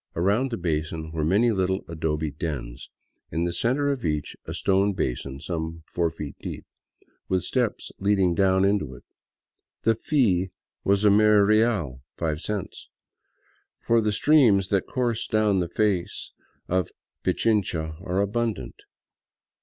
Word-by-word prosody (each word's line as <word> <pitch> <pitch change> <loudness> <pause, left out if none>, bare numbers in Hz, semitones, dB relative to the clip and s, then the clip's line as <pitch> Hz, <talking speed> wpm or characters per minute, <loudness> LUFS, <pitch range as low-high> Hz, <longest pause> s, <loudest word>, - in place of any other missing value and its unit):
About 100 +10 +2
the 115 - -3
basin 80 -1 -2
were 80 -1 -2
many 105 +9 +3
little 95 -1 0
adobe 80 -2 -2
dens, 70 -6 -5 0.4
in 85 - -1
the 85 0 -1
center 135 +9 +1
of 135 -3 -3
each 75 -3 -2
a - - -6
stone 100 +1 +2
basin 65 -3 -3
some 80 0 -4
four 85 0 0
feet 75 -3 -7
deep, - - -6 0.6
with 95 -2 +1
steps 120 +1 -1
leading 95 -3 +2
down 95 +1 +3
into 100 -10 0
it. - - -15 0.8
The 115 - +4
fee 105 - +1 0.3
was 100 +1 +2
a 105 - +7
mere 105 0 +5
real 105 - +2 0.2
(five 80 -2 -2
cents), 105 -2 -5 0.9
for 115 0 +2
the 105 -1 +1
streams 110 -6 +4
that 100 -2 +1
course 120 -3 -1
down 105 -3 +2
the 85 -2 -1
face 100 -3 -1 0.4
of 90 -1 0 0.3
Pichincha 85 -8 0
are 95 +1 0
abundant. 110 +2 -2
95 Hz, 140 wpm, -25 LUFS, 80-110 Hz, 0.9 s, a